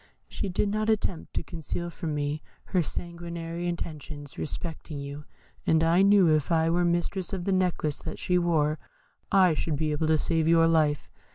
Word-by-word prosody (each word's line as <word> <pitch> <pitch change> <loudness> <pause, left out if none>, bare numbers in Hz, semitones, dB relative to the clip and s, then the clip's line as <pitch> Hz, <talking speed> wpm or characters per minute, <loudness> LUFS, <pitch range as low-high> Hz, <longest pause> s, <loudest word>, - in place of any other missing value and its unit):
She - - -4
did 185 +3 0
not 215 +1 0
attempt 205 -6 -1
to - - 0
conceal 170 0 -5
from 160 -3 -4
me 145 +1 -2 0.2
her 185 - +1
sanguinary 170 +1 -5
intentions 150 -4 -5
respecting 160 -1 -5
you; 140 +1 -7 0.4
and 160 0 +4
I 170 +3 +4
knew 200 -2 +6
if 155 -1 +2
I 165 0 +3
were 175 +1 +2
mistress 175 +3 0
of 180 -2 -3
the 195 - +1
necklace 180 -5 0
that 160 - -6
she 180 0 +1
wore, 155 -3 +1 0.5
I 190 -4 +5
should 155 0 -1
be 155 +1 0
able 155 +1 0
to 160 0 +4
save 160 +1 +1
your 165 0 +5
life. 155 -3 +2
165 Hz, 180 wpm, -27 LUFS, 155-175 Hz, 0.5 s, knew